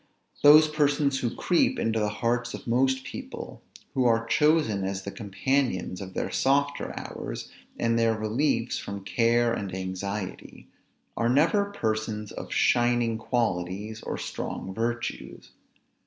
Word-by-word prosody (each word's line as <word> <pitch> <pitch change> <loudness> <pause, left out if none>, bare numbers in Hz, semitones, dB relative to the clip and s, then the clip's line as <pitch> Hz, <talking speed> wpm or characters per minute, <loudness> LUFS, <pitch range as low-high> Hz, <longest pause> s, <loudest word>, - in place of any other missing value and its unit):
Those 150 +2 +8
persons 145 -2 +1
who 120 -3 -2
creep 175 - +2
into 110 0 0
the 105 -1 +1
hearts 120 +3 -1
of - - -10
most 130 +2 +2
people, 140 - -8 0.3
who 130 -2 +1
are 115 -1 +2
chosen 150 -8 +2
as 95 0 -3
the 100 - -5
companions 105 -2 -1
of 95 -1 -8
their - - -2
softer 140 +1 +1
hours, - - -7 0.3
and 115 0 +1
their 115 -1 +2
reliefs 115 +3 0
from 100 -1 -6
care 115 +2 +2
and 100 -4 -4
anxiety, 95 +1 -5 0.5
are 115 +1 +1
never 165 - +3
persons 110 - -3
of - - -8
shining 120 -2 +2
qualities 105 -2 -2
or - - -4
strong 95 - -5
virtues. 120 +2 -4
115 Hz, 135 wpm, -27 LUFS, 105-135 Hz, 0.5 s, Those